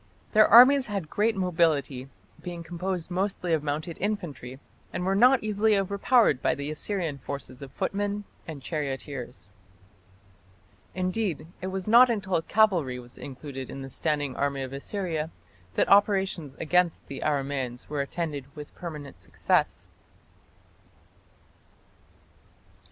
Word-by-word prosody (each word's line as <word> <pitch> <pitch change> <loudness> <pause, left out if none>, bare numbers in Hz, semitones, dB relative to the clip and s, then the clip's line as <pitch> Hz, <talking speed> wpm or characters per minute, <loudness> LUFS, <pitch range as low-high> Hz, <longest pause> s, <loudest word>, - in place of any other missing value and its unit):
Their 215 -1 +7
armies 255 +4 +8
had 200 -7 -4
great 215 +2 +1
mobility, 160 -8 0 0.3
being 175 -1 -6
composed 175 +1 -4
mostly 185 -1 -1
of 160 - +2
mounted 150 +3 -3
infantry, 170 -11 -4 0.3
and 180 - -3
were 190 - +2
not 250 +5 +5
easily 215 0 +2
overpowered 200 - +3
by - - +2
the 145 +1 -4
Assyrian 160 -3 -3
forces 130 -1 -7
of 135 -2 -9
footmen 205 +1 -2 0.2
and 150 -5 -7
charioteers. 135 - -5 1.4
Indeed, 185 -2 -1 0.2
it 185 - -3
was 190 0 -4
not 240 +3 +7
until 190 -7 0
cavalry 175 -11 +2
was 120 0 -12
included 135 -1 -7
in 135 - -7
the 135 - -8
standing 145 -3 -1
army 140 -1 -1
of 130 0 -7
Assyria 160 +1 -3 0.5
that - - +2
operations 195 -8 +3
against 175 +2 +1
the 140 - -7
Aramaeans 135 -4 -2
were 145 -1 -2
attended 150 -2 -4
with 150 -1 -9
permanent 150 -6 -8
success. - - 0
165 Hz, 125 wpm, -27 LUFS, 140-195 Hz, 1.4 s, armies